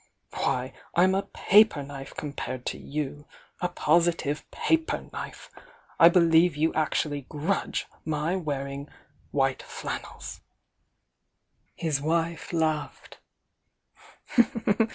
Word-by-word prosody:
Why, 130 Hz, -1 st, -1 dB, 0.2 s
I'm 185 Hz, +2 st, +5 dB
a 195 Hz, -, +2 dB
paper 205 Hz, -7 st, +4 dB
knife 135 Hz, -1 st, -9 dB
compared 130 Hz, -4 st, -5 dB
to -, -, -2 dB
you! 145 Hz, 0 st, -4 dB, 0.2 s
— -, -, -31 dB
a 180 Hz, -, +1 dB
positive 165 Hz, -3 st, +1 dB
paper 325 Hz, 0 st, 0 dB
knife! -, -, -7 dB, 0.5 s
I 165 Hz, -, +10 dB
believe 170 Hz, -2 st, +5 dB
you 160 Hz, +2 st, +2 dB
actually 150 Hz, -3 st, 0 dB
grudge 160 Hz, +6 st, -1 dB, 0.2 s
my 155 Hz, +3 st, -1 dB
wearing 140 Hz, -4 st, -3 dB, 0.4 s
white 135 Hz, -2 st, +1 dB
flannels!" -, -, -6 dB, 1.3 s
His 150 Hz, -4 st, -1 dB
wife 165 Hz, +1 st, -1 dB
laughed. 160 Hz, -3 st, -2 dB
155 Hz, 100 wpm, -27 LUFS, 145-170 Hz, 1.3 s, I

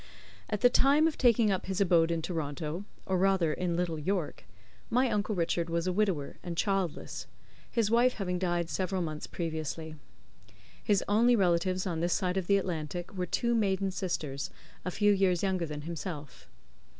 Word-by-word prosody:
At 210 Hz, -2 st, -2 dB
the 245 Hz, -, +7 dB
time 285 Hz, +5 st, +5 dB
of 320 Hz, -, -1 dB
taking 230 Hz, -4 st, +4 dB
up 185 Hz, -1 st, -2 dB
his 190 Hz, 0 st, -2 dB
abode 170 Hz, -4 st, +4 dB
in 165 Hz, -1 st, -1 dB
Toronto 160 Hz, +2 st, -3 dB, 0.2 s
or 185 Hz, -1 st, 0 dB
rather 190 Hz, -4 st, +3 dB
in 175 Hz, 0 st, -1 dB
Little 170 Hz, -3 st, -1 dB
York 180 Hz, +1 st, -2 dB, 0.4 s
my 250 Hz, +1 st, +2 dB
uncle 210 Hz, 0 st, 0 dB
Richard 170 Hz, -1 st, 0 dB
was 170 Hz, 0 st, 0 dB
a 185 Hz, -, 0 dB
widower, 185 Hz, -8 st, 0 dB
and 170 Hz, -2 st, -6 dB
childless; 195 Hz, -3 st, -1 dB, 0.4 s
his 225 Hz, -3 st, +1 dB
wife 245 Hz, +2 st, +4 dB
having 180 Hz, -3 st, -2 dB
died 175 Hz, -2 st, 0 dB
several 185 Hz, +1 st, -1 dB
months 155 Hz, -2 st, -5 dB
previously. 160 Hz, -1 st, -4 dB, 0.9 s
His 205 Hz, -4 st, +2 dB
only 235 Hz, +4 st, +4 dB
relatives 185 Hz, -1 st, +2 dB
on 170 Hz, -4 st, -2 dB
this 170 Hz, +1 st, +1 dB
side 185 Hz, -2 st, 0 dB
of 190 Hz, -2 st, -1 dB
the 200 Hz, -, +5 dB
Atlantic 175 Hz, -1 st, -4 dB
were 180 Hz, -2 st, -3 dB
two 235 Hz, +7 st, 0 dB
maiden 195 Hz, -3 st, +1 dB
sisters, 170 Hz, -7 st, -3 dB, 0.3 s
a -, -, -2 dB
few 205 Hz, +3 st, +3 dB
years 190 Hz, -2 st, +2 dB
younger 185 Hz, -3 st, 0 dB
than 150 Hz, -1 st, -5 dB
himself. 155 Hz, -3 st, -7 dB
180 Hz, 175 wpm, -30 LUFS, 165-200 Hz, 0.9 s, the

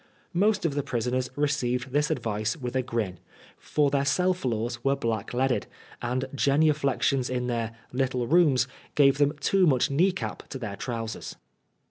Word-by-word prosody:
Most 205 Hz, +2 st, +2 dB
of 160 Hz, -, +1 dB
the 145 Hz, -, 0 dB
prisoners 125 Hz, -1 st, -1 dB
received 130 Hz, -3 st, 0 dB
this 145 Hz, +2 st, +1 dB
advice 115 Hz, -4 st, -1 dB
with 125 Hz, -3 st, -5 dB
a 130 Hz, -, +3 dB
grin, 110 Hz, -7 st, -3 dB, 0.4 s
for 145 Hz, -2 st, +1 dB
their 140 Hz, -1 st, +2 dB
cell 180 Hz, +7 st, +2 dB
floors 120 Hz, -6 st, -3 dB
were 135 Hz, 0 st, +3 dB
black 115 Hz, -5 st, -2 dB
leaded, 130 Hz, +1 st, 0 dB, 0.3 s
and 125 Hz, +2 st, -1 dB
genuflexions 140 Hz, -2 st, +2 dB
in 125 Hz, -1 st, -1 dB
their 115 Hz, -2 st, -2 dB
'' -, -, -33 dB
little 125 Hz, -2 st, 0 dB
rooms 140 Hz, -4 st, +4 dB
" -, -, -27 dB
gave 140 Hz, -1 st, +5 dB
them 145 Hz, +1 st, +2 dB
too 185 Hz, +5 st, +3 dB
much 130 Hz, -2 st, +3 dB
knee 175 Hz, +8 st, +4 dB
cap 190 Hz, -, -6 dB
to 135 Hz, -, -5 dB
their 110 Hz, -6 st, -5 dB
trousers. 115 Hz, -1 st, -5 dB
130 Hz, 170 wpm, -27 LUFS, 120-145 Hz, 0.4 s, gave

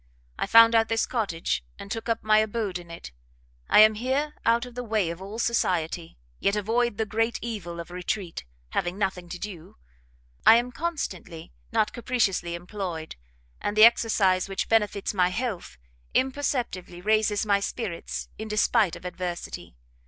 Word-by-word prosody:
I -, -, 0 dB
found 230 Hz, 0 st, +8 dB
out 225 Hz, -1 st, +4 dB
this 225 Hz, 0 st, +1 dB
cottage, 185 Hz, -, -2 dB
and 200 Hz, -, -10 dB
took 225 Hz, 0 st, -4 dB
up 230 Hz, 0 st, 0 dB
my 215 Hz, 0 st, +5 dB
abode 215 Hz, -4 st, -1 dB
in 175 Hz, -1 st, -13 dB
it. 170 Hz, -, -9 dB, 0.6 s
I -, -, +8 dB
am 215 Hz, 0 st, +7 dB
here 265 Hz, +7 st, -1 dB
out 235 Hz, +1 st, +3 dB
of 245 Hz, -, -11 dB
the 245 Hz, +1 st, -5 dB
way 215 Hz, -7 st, 0 dB
of 170 Hz, +2 st, -8 dB
all 200 Hz, +3 st, -7 dB
society, 175 Hz, -8 st, -1 dB, 0.2 s
yet 200 Hz, -, +1 dB
avoid 225 Hz, +2 st, 0 dB
the 220 Hz, -, 0 dB
great 225 Hz, +2 st, 0 dB
evil 195 Hz, -7 st, -5 dB
of 170 Hz, +1 st, -8 dB
retreat, 180 Hz, 0 st, -4 dB, 0.3 s
having 175 Hz, -, -2 dB
nothing 190 Hz, -3 st, -2 dB
to 180 Hz, -, -5 dB
do. 175 Hz, -, -8 dB, 0.7 s
I -, -, +9 dB
am 240 Hz, +1 st, +1 dB
constantly, 200 Hz, -, -5 dB, 0.2 s
not 210 Hz, -, +1 dB
capriciously 220 Hz, -8 st, 0 dB
employed, 175 Hz, -3 st, -5 dB, 0.5 s
and 205 Hz, +1 st, -2 dB
the 215 Hz, -, +10 dB
exercise 200 Hz, -5 st, +3 dB
which 195 Hz, -, -2 dB
benefits 210 Hz, -3 st, +1 dB
my 180 Hz, -3 st, +3 dB
health, 210 Hz, -, -4 dB, 0.4 s
imperceptibly 255 Hz, -9 st, -1 dB
raises 215 Hz, +2 st, +2 dB
my 200 Hz, -1 st, +3 dB
spirits 200 Hz, -3 st, -4 dB
in 220 Hz, -, -5 dB
despight 215 Hz, -3 st, +2 dB
of -, -, -12 dB
adversity. 180 Hz, -, -5 dB
210 Hz, 160 wpm, -26 LUFS, 180-230 Hz, 0.7 s, the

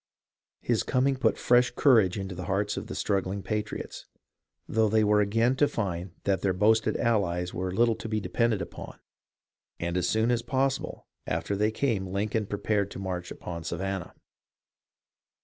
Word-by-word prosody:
His -, -, +1 dB
coming 135 Hz, +2 st, +1 dB
put 130 Hz, -, +1 dB
fresh 125 Hz, 0 st, +4 dB
courage 115 Hz, -9 st, +4 dB
into 95 Hz, -1 st, -4 dB
the 90 Hz, 0 st, -6 dB
hearts 100 Hz, +1 st, 0 dB
of -, -, -5 dB
the -, -, -6 dB
struggling 100 Hz, -1 st, -1 dB
patriots, 105 Hz, 0 st, -4 dB, 0.6 s
though 110 Hz, 0 st, +2 dB
they 110 Hz, +1 st, +3 dB
were 105 Hz, 0 st, +4 dB
again 115 Hz, +5 st, +2 dB
to 145 Hz, -, +4 dB
find 95 Hz, -6 st, -3 dB
that 95 Hz, -3 st, +1 dB
their 95 Hz, -2 st, +1 dB
boasted 110 Hz, +4 st, +3 dB
allies 90 Hz, -6 st, 0 dB
were 90 Hz, +1 st, -2 dB
little 115 Hz, +4 st, +3 dB
to 115 Hz, -, -6 dB
be 110 Hz, 0 st, 0 dB
depended 115 Hz, 0 st, 0 dB
upon, -, -, -9 dB, 0.8 s
and 85 Hz, 0 st, -2 dB
as 90 Hz, -1 st, +1 dB
soon 110 Hz, +2 st, +2 dB
as 120 Hz, -1 st, +1 dB
possible 135 Hz, +1 st, -1 dB, 0.2 s
after 85 Hz, +5 st, -1 dB
they 105 Hz, +2 st, +2 dB
came 110 Hz, -4 st, -1 dB
Lincoln 100 Hz, +3 st, -1 dB
prepared 100 Hz, -1 st, 0 dB
to -, -, -8 dB
march 90 Hz, -2 st, -4 dB
upon 85 Hz, -1 st, -7 dB
Savannah. 95 Hz, +2 st, -4 dB
105 Hz, 165 wpm, -28 LUFS, 95-115 Hz, 0.8 s, fresh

